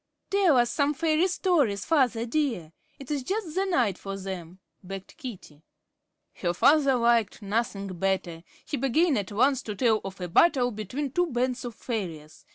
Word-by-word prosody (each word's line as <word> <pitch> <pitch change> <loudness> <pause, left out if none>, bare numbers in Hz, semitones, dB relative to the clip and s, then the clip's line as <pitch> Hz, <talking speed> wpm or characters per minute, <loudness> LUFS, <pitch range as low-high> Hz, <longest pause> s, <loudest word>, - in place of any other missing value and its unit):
"Tell 385 -8 +4
us 240 -1 +3
some 290 0 +1
fairy 320 +4 +2
stories, 305 - +1
father 250 -7 +2
dear. 235 - -2 0.2
It 275 0 -9
is 290 -2 0
just 375 - -3
the 380 +3 0
night 245 - +1
for 195 0 -5
them," 185 -2 -7 0.2
begged 195 0 -9
Katie. 200 - -9 0.7
Her 175 -1 -2
father 275 - +4
liked 235 -4 +2
nothing 200 -1 -1
better. 185 -3 -1 0.2
He 290 - -3
began 275 +5 +2
at 200 -2 -2
once 260 +5 +2
to 210 - -6
tell 220 0 +2
of 195 0 -7
a 180 - -4
battle 245 - +4
between 245 +7 -4
two 355 +4 +1
bands 255 -2 -1
of 240 -2 -6
fairies. 165 -12 -6
240 Hz, 165 wpm, -27 LUFS, 195-290 Hz, 0.7 s, Tell